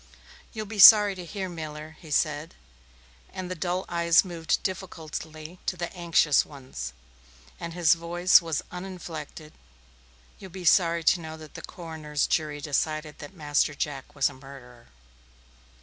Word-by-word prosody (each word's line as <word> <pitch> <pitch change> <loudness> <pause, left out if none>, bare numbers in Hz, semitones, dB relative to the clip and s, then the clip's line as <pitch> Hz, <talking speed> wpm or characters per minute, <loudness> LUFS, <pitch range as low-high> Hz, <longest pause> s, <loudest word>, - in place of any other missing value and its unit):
"You'll 215 -1 -5
be 210 0 -7
sorry 210 0 +10
to 185 -1 -8
hear, 190 +2 -5
Miller," 155 -2 -8
he 160 - -13
said 150 +1 0 0.8
and 185 -1 -6
the - - 0
dull 180 +2 -2
eyes 170 +1 +3
moved 170 -3 -2
difficultly 165 -2 -6
to 180 - -1
the 175 +2 -5
anxious 165 -4 +3
ones, 130 - -8 0.7
and 170 0 -6
his 170 -3 +5
voice 175 +2 +4
was 165 -3 -3
uninflected 170 -4 -8 0.9
"you'll 190 - -10
be 185 0 -9
sorry 170 0 +4
to 175 - +4
know 160 -1 -8
that 155 -1 -13
the - - -8
coroner's 160 -4 -4
jury 150 -2 -1
decided 155 +1 -2
that 150 +6 -10
Master 145 -2 0
Jack 145 0 -5
was 140 - +3
a - - -6
murderer." 130 -3 -14
165 Hz, 150 wpm, -26 LUFS, 150-180 Hz, 0.9 s, sorry